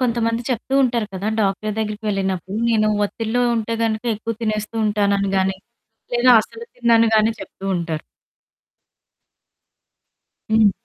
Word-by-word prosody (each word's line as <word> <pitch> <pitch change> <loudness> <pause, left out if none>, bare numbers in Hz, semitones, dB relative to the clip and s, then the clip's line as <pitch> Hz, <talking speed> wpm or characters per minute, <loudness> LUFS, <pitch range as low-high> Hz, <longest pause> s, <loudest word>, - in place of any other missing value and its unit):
కొంతమంది 230 -2 0
చెప్తూ 250 +2 -2
ఉంటారు 235 -3 +1
కదా! 195 +3 -3
డాక్టరు 205 +1 0
దగ్గరికి 215 0 -3
వెళ్ళినప్పుడు, 190 -1 -2
నేను 215 -2 +3 0.2
ఒత్తిడిలో 225 +4 -1
ఉంటే 225 +1 -2
గనుక 220 0 -1
ఎక్కువ 225 +2 -4
తినేస్తూ 215 0 -2
ఉంటాననుగాని. 200 -2 +1 0.6
లేదా 245 +1 +5
అసలు 455 - -12
తినననిగానే 225 -2 +4
చెప్తూ 195 0 -10
ఉంటారు. 165 -3 -3 2.5
హ్మ్. 220 -2 +5
215 Hz, 110 wpm, -21 LUFS, 200-230 Hz, 2.5 s, లేదా